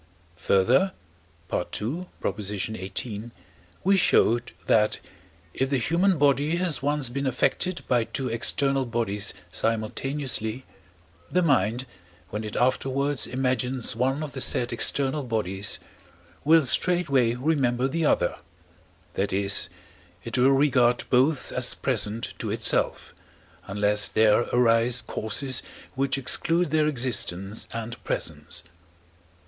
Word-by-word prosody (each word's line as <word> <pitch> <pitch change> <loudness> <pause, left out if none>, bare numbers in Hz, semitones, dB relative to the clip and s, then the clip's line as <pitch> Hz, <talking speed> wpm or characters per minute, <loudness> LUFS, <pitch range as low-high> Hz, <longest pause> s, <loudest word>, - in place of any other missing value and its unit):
Further 120 - +2 0.6
(II. 135 - -3 0.3
xviii.), 105 +2 -3 0.5
we 195 +2 +4
showed 120 -8 +3
that, 105 -1 +2 0.5
if 130 0 -1
the 135 - +1
human 170 +8 +1
body 145 +2 +2
has 175 -6 +1
once 145 -2 +1
been 140 +2 -3
affected 170 +7 0
by 120 -3 +1
two 130 +2 -4
external 135 +3 +1
bodies 115 -4 -2 0.2
simultaneously, 115 +2 -2 0.7
the 180 0 +2
mind, 125 - +1 0.5
when 105 +2 -4
it 105 - -6
afterwards 135 +2 +1
imagines 130 -1 0
one 135 +5 -1
of 150 - -6
the 135 - -4
said 120 -1 +3
external 135 +4 +2
bodies, 105 -5 -2 0.7
will 160 0 +5
straightway 140 -6 +3
remember 130 -2 0
the 165 +4 -2
other 150 - +1 0.7
that 100 - -2
is, 100 +1 +2 0.5
it 115 - -5
will 130 +1 +4
regard 135 -3 +3
both 135 +3 +2
as 125 -1 +2
present 115 -3 -2
to - - -3
itself, - - 0 0.5
unless 105 +1 +2
there 110 +1 +3
arise 120 0 +2
causes 130 +5 -2 0.3
which 135 +1 0
exclude 165 +5 0
their 155 -1 +2
existence 115 -7 0
and 115 0 -6
presence. 80 +2 -3
125 Hz, 115 wpm, -25 LUFS, 110-140 Hz, 0.7 s, will